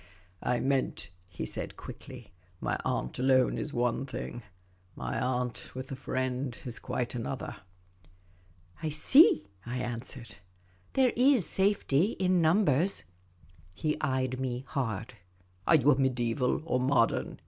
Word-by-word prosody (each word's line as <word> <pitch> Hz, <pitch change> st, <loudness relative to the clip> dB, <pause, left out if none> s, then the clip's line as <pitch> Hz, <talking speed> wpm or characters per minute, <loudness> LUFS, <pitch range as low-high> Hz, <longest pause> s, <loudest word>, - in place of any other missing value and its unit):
" 90 Hz, -, -33 dB
I 125 Hz, -1 st, 0 dB
meant," 135 Hz, -7 st, -1 dB, 0.2 s
he 90 Hz, -, -5 dB
said, -, -, -3 dB
quickly, 125 Hz, -7 st, -10 dB
" 90 Hz, -1 st, -33 dB
my -, -, -1 dB
aunt 60 Hz, -, -2 dB
alone 130 Hz, -1 st, +3 dB
is 150 Hz, -, -4 dB
one 120 Hz, +1 st, 0 dB
thing; 120 Hz, -2 st, -6 dB, 0.5 s
my -, -, -3 dB
aunt 125 Hz, -1 st, -2 dB
with 130 Hz, +1 st, -6 dB
a -, -, -3 dB
friend 130 Hz, -1 st, -2 dB
is 120 Hz, -3 st, -6 dB
quite 120 Hz, -, -3 dB
another." 125 Hz, +2 st, -4 dB, 0.6 s
" 90 Hz, -, -30 dB
I 160 Hz, -, -1 dB
see," 265 Hz, -, +6 dB, 0.2 s
I 120 Hz, +3 st, -4 dB
answered, 120 Hz, 0 st, -5 dB, 0.3 s
" 90 Hz, 0 st, -33 dB
There 260 Hz, -2 st, +3 dB
is 255 Hz, -, +4 dB
safety 195 Hz, -2 st, +2 dB
in 185 Hz, -1 st, +2 dB
numbers." 165 Hz, 0 st, +3 dB, 0.7 s
He 155 Hz, -1 st, 0 dB
eyed 130 Hz, -3 st, 0 dB
me 130 Hz, 0 st, -3 dB
hard. 115 Hz, -5 st, -3 dB, 0.3 s
*' 90 Hz, 0 st, -34 dB
Are -, -, +7 dB
you 145 Hz, -1 st, +5 dB
mediaeval 125 Hz, 0 st, 0 dB
or 125 Hz, -6 st, +1 dB
modern 125 Hz, -2 st, +1 dB
130 Hz, 145 wpm, -30 LUFS, 120-145 Hz, 0.7 s, Are